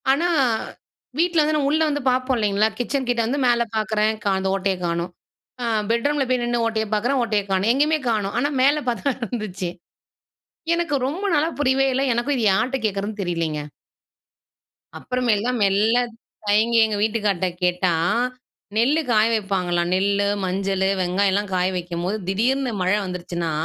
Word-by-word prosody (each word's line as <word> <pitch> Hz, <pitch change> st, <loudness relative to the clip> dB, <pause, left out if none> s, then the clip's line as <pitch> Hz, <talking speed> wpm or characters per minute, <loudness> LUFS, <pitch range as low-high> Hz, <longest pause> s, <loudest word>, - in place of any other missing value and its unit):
ஆனா, 310 Hz, +6 st, +2 dB, 0.9 s
வீட்ல 340 Hz, -1 st, +3 dB
வந்து 305 Hz, +1 st, +1 dB
நம்ம 280 Hz, -2 st, +1 dB
உள்ள 315 Hz, +1 st, +2 dB
வந்து 290 Hz, 0 st, -2 dB
பாப்போம் 255 Hz, +1 st, 0 dB
இல்லைங்களா, 210 Hz, -1 st, +2 dB
கிச்சன் 260 Hz, +1 st, -1 dB
கிட்ட 240 Hz, -1 st, +2 dB
வந்து 270 Hz, +5 st, -1 dB
மேல 235 Hz, -1 st, +3 dB
பாக்குறேன். 215 Hz, 0 st, +1 dB
கா 205 Hz, -, +1 dB
அந்த 190 Hz, -, -2 dB
ஓட்டையை 195 Hz, -1 st, -1 dB
காணோம். 170 Hz, +1 st, -2 dB, 0.5 s
அ -, -, -1 dB, 0.3 s
பெட்ரூம்ல 275 Hz, +4 st, +1 dB
போய் 255 Hz, -1 st, +1 dB
நின்னு 240 Hz, -1 st, 0 dB
ஓட்டையை 220 Hz, -1 st, -1 dB
பாக்குறேன் 245 Hz, +6 st, +1 dB
ஓட்டைய 215 Hz, -3 st, 0 dB
காணும். 190 Hz, +3 st, +2 dB
எங்கயுமே 300 Hz, +4 st, +2 dB
காணோம் 210 Hz, -3 st, -1 dB
ஆனா 285 Hz, +4 st, +1 dB
மேல 285 Hz, +3 st, +3 dB
பாத்தா 245 Hz, +4 st, -1 dB
இருந்துச்சு. 210 Hz, -7 st, -4 dB, 1.0 s
எனக்கு 335 Hz, -3 st, 0 dB
ரொம்ப 345 Hz, +9 st, -4 dB
நாளா 300 Hz, +2 st, +2 dB
புரியவே 270 Hz, -1 st, +2 dB
இல்ல, 265 Hz, +2 st, +1 dB
எனக்கும் 240 Hz, +5 st, 0 dB
இதை 230 Hz, -, 0 dB
யார்ட்ட 225 Hz, +7 st, +1 dB
கேட்கிறதுன்னு 205 Hz, +1 st, -2 dB
தெரிலிங்க. 165 Hz, -4 st, -2 dB, 1.4 s
அப்பறமேல்தான், 245 Hz, -1 st, 0 dB
மெல்ல 205 Hz, +4 st, +3 dB, 0.5 s
தயங்கி 220 Hz, +3 st, +3 dB
எங்க 215 Hz, -1 st, -2 dB
வீட்டுக்கார்ட்ட 210 Hz, -4 st, 0 dB, 0.2 s
கேட்டா, 180 Hz, 0 st, +2 dB, 0.9 s
நெல்லு 275 Hz, +8 st, +3 dB
காய 215 Hz, -1 st, +4 dB
வைப்பாங்களாம். 180 Hz, -5 st, 0 dB
நெல்லு, 200 Hz, +1 st, +1 dB, 0.2 s
மஞ்சளு, 190 Hz, +1 st, 0 dB
வெங்காயம் 190 Hz, +2 st, +1 dB
எல்லாம் 205 Hz, 0 st, -1 dB
காய 180 Hz, 0 st, +2 dB
வைக்கும்போது, 175 Hz, +3 st, -3 dB
திடீர்னு 250 Hz, +6 st, +1 dB
மழை 185 Hz, +3 st, +2 dB
வந்துருச்சுனா 175 Hz, -2 st, -4 dB
215 Hz, 150 wpm, -22 LUFS, 195-255 Hz, 1.4 s, காய